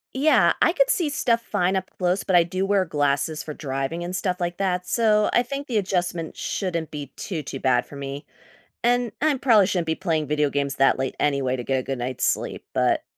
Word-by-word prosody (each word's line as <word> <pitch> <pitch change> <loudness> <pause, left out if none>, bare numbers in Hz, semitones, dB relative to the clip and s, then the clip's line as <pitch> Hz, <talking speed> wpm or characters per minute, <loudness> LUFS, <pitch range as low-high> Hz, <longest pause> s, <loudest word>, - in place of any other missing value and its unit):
Yeah, 260 - +4
I 340 - +4
could - - +3
see 350 -11 +1
stuff 235 -5 +1
fine 190 -3 0
up 190 0 -2
close, 180 +1 0
but 190 - +1
I 175 - +7
do 185 +3 -2
wear 195 -2 +2
glasses 145 0 0
for 150 - -7
driving 135 +4 -3
and 180 +1 -4
stuff 180 0 -1
like 175 0 -2
that, 180 -2 -1
so 215 -1 +2
I - - +5
think 275 +3 -5
the 245 -6 -1
adjustment 175 -4 -2
shouldn't 170 -5 -3
be 145 -2 -6
too, 175 -6 -4
too 135 -1 -6
bad 125 -2 +2
for 145 - -11
me, 140 +1 -6 0.6
and 245 -1 +2
I'm 300 -3 +2
probably 225 -7 +5
shouldn't 180 -4 -1
be 160 - +1
playing 160 -5 -1
video 150 -1 +1
games 140 -1 -1
that 135 -1 +3
late 135 -1 -2
anyway 140 -3 +1
to 125 - -5
get 135 +1 0
a 130 - -4
good 135 -1 -3
night's 125 +1 -2
sleep, - - -5
but - - +2
175 Hz, 225 wpm, -24 LUFS, 145-205 Hz, 0.6 s, I